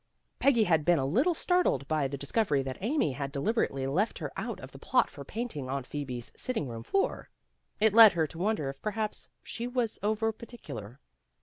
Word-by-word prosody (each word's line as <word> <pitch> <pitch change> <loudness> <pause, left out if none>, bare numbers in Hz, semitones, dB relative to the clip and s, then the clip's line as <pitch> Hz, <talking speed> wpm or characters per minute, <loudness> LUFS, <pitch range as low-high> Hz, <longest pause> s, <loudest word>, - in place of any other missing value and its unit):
Peggy 250 -5 +4
had 160 -6 +2
been 175 +2 +4
a 135 - 0
little 265 - +2
startled 360 - +1
by 155 -2 +1
the 140 +1 -5
discovery 145 - +1
that 130 -1 -5
Amy 235 - +1
had 140 +1 -4
delib 150 +11 0
erately 135 - 0
left 190 +11 0
her - - -5
out - - -4
of - - -10
the - - -12
plot - - +2
for - - -9
painting 215 - -5
Aunt 135 -1 -3
Phosbe's 130 -5 -5
sitting 230 - -1
room 115 -2 -6
floor. 390 - -1 0.5
It 215 -1 +4
led 225 -2 +9
her 165 -2 +1
to 160 +2 -9
wonder 195 -6 0
if 135 0 -6
perhaps 215 0 -3
she 235 +1 -5
was 245 -3 -1
over 220 +2 +1
particular. 135 - -9
175 Hz, 200 wpm, -29 LUFS, 140-225 Hz, 0.5 s, led